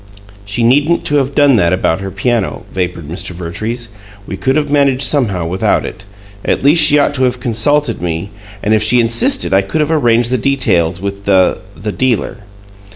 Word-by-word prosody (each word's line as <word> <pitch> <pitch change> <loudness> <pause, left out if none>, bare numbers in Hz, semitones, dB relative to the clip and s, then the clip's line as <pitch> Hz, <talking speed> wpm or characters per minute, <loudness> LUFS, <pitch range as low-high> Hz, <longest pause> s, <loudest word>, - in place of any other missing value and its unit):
"She 100 +4 -2
needn't 145 +8 +2
to 145 - +1
have 135 0 -1
done 145 -4 +4
that 85 -3 +2
about 90 -2 0
her 95 0 -5
piano," 105 +3 -2
vapored 90 -4 -3
Mr. 90 +4 -6
Vertrees. 110 +8 -5 0.4
"We 95 - -6
could 130 +8 -1
have 150 -2 -1
managed 140 -2 +2
somehow 120 - 0
without 90 +3 0
it. 95 - -9 0.4
At - - -1
least 155 +3 +5
she 150 -1 +5
ought 145 - +2
to 130 -2 -1
have 125 0 -1
consulted 125 - 0
me, 85 +3 -4 0.3
and 105 - +1
if 110 - +2
she 110 +3 +3
insisted 235 - +2
I 95 - +4
could 95 +11 -3
have 150 +1 0
arranged 120 -6 +2
the 130 - +1
details 95 -11 0
with 100 +1 -6
the 95 -2 +2 0.2
the 105 +1 -4
dealer." 125 -1 -1
115 Hz, 190 wpm, -14 LUFS, 95-140 Hz, 0.4 s, least